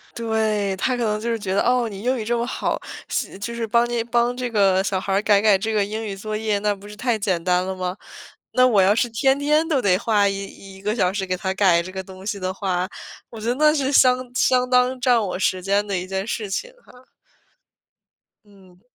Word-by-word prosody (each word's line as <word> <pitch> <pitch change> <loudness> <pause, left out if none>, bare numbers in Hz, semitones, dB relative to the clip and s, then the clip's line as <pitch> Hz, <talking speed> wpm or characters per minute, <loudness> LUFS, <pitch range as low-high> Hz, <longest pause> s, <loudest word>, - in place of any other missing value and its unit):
对， 220 -3 0
他 250 +7 0
可 240 - -1
能 210 -1 0
就 235 - -2
是 230 - -2
觉 190 -2 -3
得， 200 - +2
哦， 245 -1 +2
你 200 -2 -8
英 255 +2 +1
语 220 - -4
这 235 +1 0
么 235 - -1
好， 245 - -2 0.3
息 - - -3
就 235 +4 -5
是 230 -1 -2
帮 235 +2 +2
你 240 -1 -1
帮 240 +1 +1
这 250 -1 -3
个 195 -3 +3
小 195 -1 -1
孩 195 - -3
儿 195 - +2
改 205 -2 +3
改 210 -2 +5
这 220 +3 -3
个 210 -1 +2
英 215 +2 -5
语 205 - -4
作 215 +2 -5
业， 215 -1 -1
那 205 0 0
不 200 +1 -14
是 210 - -10
太 240 0 0
简 190 -5 -1
单 180 +1 +1
了 190 - -3
吗？ 185 0 -3 0.6
那 255 0 +5
我 220 -6 +4
要 190 +2 +4
是 240 +1 +1
天 265 +4 +2
天 300 +3 +2
都 295 -5 +1
得 185 -4 +3
花 210 -1 +2
一 195 - -1 0.4
一 190 - -14
个 210 +2 -1
小 185 -6 +1
时 195 0 -3
给 185 -1 -1
他 190 +1 -3
改 185 -4 +4
这 185 - -8
个 190 0 -5
东 190 0 -12
西 205 -1 -3
的 185 0 -3
话， 185 -2 -2 0.4
我 225 - -9
觉 220 - -4
得 245 - +1
那 300 +2 +4
是 275 -3 0
相 255 -2 +5 0.2
相 250 0 +2
当 250 +1 +3
占 245 -3 +3
我 185 -3 -3
时 185 -1 0
间 200 +2 +1
的 200 -2 -2
一 180 +1 -5
件 190 +1 -3
事 215 -2 -4
情 - - -3
哈。 250 - -18 1.4
嗯。 190 -3 -21
210 Hz, 265 characters per minute, -22 LUFS, 195-240 Hz, 1.4 s, 改